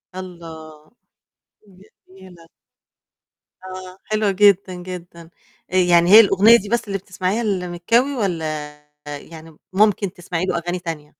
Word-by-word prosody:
الله! 160 -4 -11 1.2
جميلة. 185 -3 -16 1.2
آه 185 0 -9
حلوة 215 -2 0
جدًا 195 -1 +3
جدًا. 175 -2 -10 0.4
آآ - - -3
يعني 175 -1 +4
هي 215 - +11
الأغنية 210 +2 +6
دي 205 -2 -8
بس 235 -1 -1
اللي 195 - -2
بتسمعيها 190 +3 -3
لمكاوي 200 +7 0
والّا 155 -8 -3 0.3
يعني 155 +2 -10 0.2
ممكن 200 -2 +2
تسمعي 175 -1 -4
له - - -1
أغاني 175 +1 -3
تانية؟ 160 -3 -7
185 Hz, 120 wpm, -20 LUFS, 170-200 Hz, 1.2 s, هي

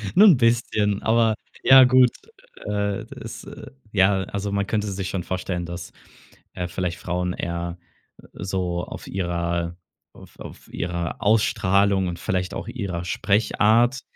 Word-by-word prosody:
Nur 215 - +8
'n 175 -9 +7
bisschen, 115 -4 +1
aber, 115 -1 +3 0.3
ja 130 0 +9
gut. 125 -1 +5 0.5
Äh, 100 -1 -2
das, - - -9
äh - - -10 0.2
ja, 95 -1 +3
also 100 +2 -4
man 100 -1 -1
könnte 105 -1 -1
sich 95 -1 -4
schon 95 -2 -3
vorstellen, 90 -1 -3
dass, 85 0 -7 0.6
äh, 90 - -4
vielleicht 85 0 -3
Frauen 90 0 -2
eher 85 0 -4 0.6
so 90 -2 -3
auf - - -9
ihrer 85 -2 -2 0.4
auf - - -16
auf - - -11
ihrer 85 -1 -3
Ausstrahlung 100 -3 +2
und 85 -1 -5
vielleicht 90 +1 -2
auch - - -5
ihrer 90 -8 -4
Sprechart, 110 +6 +2
95 Hz, 140 wpm, -23 LUFS, 90-105 Hz, 0.6 s, ja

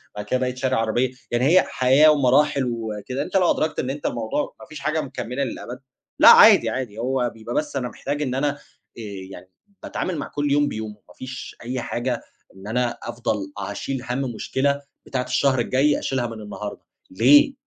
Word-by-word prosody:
بعد 105 0 -5
كده 130 - 0
بقيت 130 0 -2
شاري 130 0 0
عربية. 115 +2 +1 0.2
يعني 120 +2 +1
هي 180 +6 +6
حياة 135 +5 +5
ومراحل 140 0 +3
وكده، 110 +4 -4
أنت 190 - -1
لو 180 -2 +4
أدركت 155 - -1
إن 130 - -2
أنت 145 +2 -5
الموضوع 115 +4 -2
ما - - -11
فيش 155 - -10
حاجة 155 +1 -1
مكملة 130 -1 -4
للأبد، 125 -1 -6 0.4
لأ - - +9
عادي - - +8
عادي 125 -5 -4
هو 125 0 0
بيبقى 115 +1 -7
بس 150 -2 -1
أنا 125 -2 -2
محتاج 145 +4 -4
إن 130 -3 -1
أنا 145 +2 +1
آآ 145 - -10 0.7
يعني 95 0 -11 0.3
باتعامل 185 -3 -3
مع 145 - -4
كُلّ 145 -1 -2
يوم 145 +1 +3
بيومه، 110 -5 -5 0.2
ما - - -15
فيش 130 +4 -8
أي 125 +1 -3
حاجة 120 0 -2 0.3
إن 95 +1 -11
أنا 120 +2 -1
أفضَل 110 -4 -3
أشيل 105 +6 -4
هَم 125 +2 -1
مشكلة 135 +3 -1 0.2
بتاعة 125 -2 -2
الشهر 130 +1 +1
الجاي 135 +5 +2
أشيلها 130 -3 -1
من 115 -2 -8
النهارده، 105 0 -7 0.3
ليه، 135 - +6
130 Hz, 185 wpm, -23 LUFS, 115-140 Hz, 0.7 s, لأ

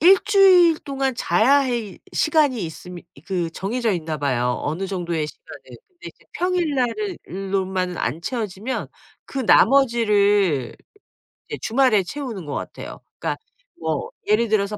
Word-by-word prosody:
1 370 +3 +7
주일 370 -5 +6
동안 270 -2 -2
자야하 270 +5 +3
이 230 -5 -3
시간이 295 - +2
있음 180 +2 -8 0.3
그 180 -4 -1
정해져 225 +4 -1
있나 160 -3 -3
봐요 125 -3 0
어느 170 +6 -2
정도의 170 -5 -2
시간은. - - -12 0.3
근데 350 -2 -11
이제 - - -18
평일날을 355 - -1 0.3
로만 185 -2 -1
안 160 - -2
채워지면 220 +2 -4 0.4
그 275 - -6
나머지를 210 - +3 0.7
이제 - - -4
주말에 225 -5 +3
채우는 230 - -6
것 145 - -5
같아요. - - -7 0.2
그니까 - - -2 0.4
뭐 160 -2 -2 0.2
예를 220 +2 +3
들어서 210 -1 0
215 Hz, 285 characters per minute, -22 LUFS, 180-275 Hz, 0.7 s, 1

